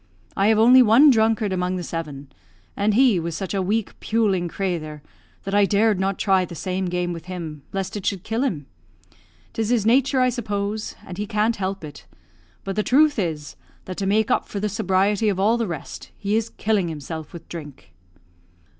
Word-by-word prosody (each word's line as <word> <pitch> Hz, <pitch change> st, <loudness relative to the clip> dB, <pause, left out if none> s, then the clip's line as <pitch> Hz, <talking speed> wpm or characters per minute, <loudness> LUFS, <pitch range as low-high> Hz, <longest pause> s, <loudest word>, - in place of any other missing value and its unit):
I 195 Hz, -, +2 dB
have 220 Hz, 0 st, +4 dB
only 245 Hz, +4 st, +7 dB
one 250 Hz, +6 st, +7 dB
drunkard 220 Hz, -3 st, +2 dB
among 180 Hz, 0 st, -1 dB
the 180 Hz, -, -4 dB
seven; 145 Hz, -5 st, -6 dB, 0.4 s
and 205 Hz, +1 st, +1 dB
he 245 Hz, -6 st, +4 dB
was 165 Hz, 0 st, -4 dB
such 195 Hz, 0 st, -4 dB
a 195 Hz, -, 0 dB
weak, 205 Hz, +3 st, -2 dB
puling 205 Hz, -6 st, +1 dB
crathur, 160 Hz, -5 st, -4 dB, 0.4 s
that 195 Hz, -, -5 dB
I 205 Hz, 0 st, +5 dB
dared 205 Hz, 0 st, +2 dB
not 195 Hz, 0 st, 0 dB
try 190 Hz, -2 st, +2 dB
the 175 Hz, -1 st, -7 dB
same 185 Hz, +3 st, -2 dB
game 175 Hz, 0 st, -2 dB
with 165 Hz, -1 st, -8 dB
him, 165 Hz, -5 st, -6 dB
lest 195 Hz, 0 st, -3 dB
it 205 Hz, -, -5 dB
should 195 Hz, -2 st, -2 dB
kill 225 Hz, +2 st, -2 dB
him. 165 Hz, -, -2 dB, 0.9 s
'Tis 225 Hz, -1 st, -2 dB
his 235 Hz, -4 st, +1 dB
nature, 265 Hz, +3 st, +3 dB
I 255 Hz, 0 st, +4 dB
suppose, 210 Hz, -3 st, -3 dB
and 185 Hz, +1 st, -8 dB
he 210 Hz, -, -3 dB
can't 220 Hz, +1 st, 0 dB
help 195 Hz, -1 st, -3 dB
it; 140 Hz, -, -10 dB, 0.6 s
but 195 Hz, -1 st, -4 dB
the 215 Hz, -, +1 dB
truth 290 Hz, +3 st, +3 dB
is, 155 Hz, -6 st, -3 dB, 0.3 s
that 185 Hz, -, -7 dB
to 195 Hz, -, -2 dB
make 215 Hz, +2 st, +2 dB
up -, -, +1 dB
for 200 Hz, -, -4 dB
the 210 Hz, +1 st, -1 dB
sobriety 200 Hz, +1 st, +1 dB
of 190 Hz, -2 st, -1 dB
all 215 Hz, +4 st, +3 dB
the 230 Hz, -2 st, -1 dB
rest, 170 Hz, -5 st, -7 dB
he 205 Hz, +1 st, -1 dB
is 225 Hz, 0 st, 0 dB
killing 205 Hz, -4 st, 0 dB
himself 160 Hz, 0 st, -6 dB
with 170 Hz, -2 st, -11 dB
drink." 150 Hz, -5 st, -10 dB
195 Hz, 200 wpm, -23 LUFS, 175-220 Hz, 0.9 s, only